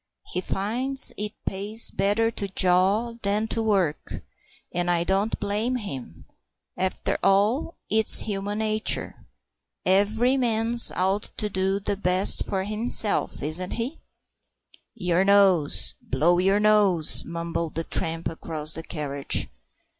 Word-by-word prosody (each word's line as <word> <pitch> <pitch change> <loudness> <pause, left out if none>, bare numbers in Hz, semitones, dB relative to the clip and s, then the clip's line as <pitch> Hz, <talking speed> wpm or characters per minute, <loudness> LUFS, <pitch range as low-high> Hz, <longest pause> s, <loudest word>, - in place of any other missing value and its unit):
He 180 - -1
finds 250 +9 +1
it 210 +1 -4
pays 205 +4 0
better 205 +4 +1
to 200 -3 -3
jaw 190 +5 +1
than 210 +2 0
to 225 - -1
work, 195 -9 -2 0.5
and 175 0 -1
I 170 -1 +1
don't 195 +4 -1
blame 210 +5 -2
him. 135 - -8 0.5
After 185 0 -2
all, 210 +12 +1
it's 220 0 +5
human 205 0 -4
nature. 215 0 0 0.6
Every 215 +7 +2
man's 235 -1 +3
out 190 +3 -1
to 210 - -1
do 190 +1 -1
the 200 0 -3
best 185 0 +2
for 190 -1 -2
himself, 215 - +1
isn't 165 +5 0
he?" 245 +7 -5 1.0
"Your 180 -3 0
nose 195 -6 +3
blow 170 +7 +1
your 195 +3 +2
nose," 205 -6 +3
mumbled 170 -1 -5
the 165 - -1
tramp 165 0 -2
across 160 -1 -5
the 160 - -5
carriage. 145 -4 -3
195 Hz, 125 wpm, -24 LUFS, 175-215 Hz, 1.0 s, it's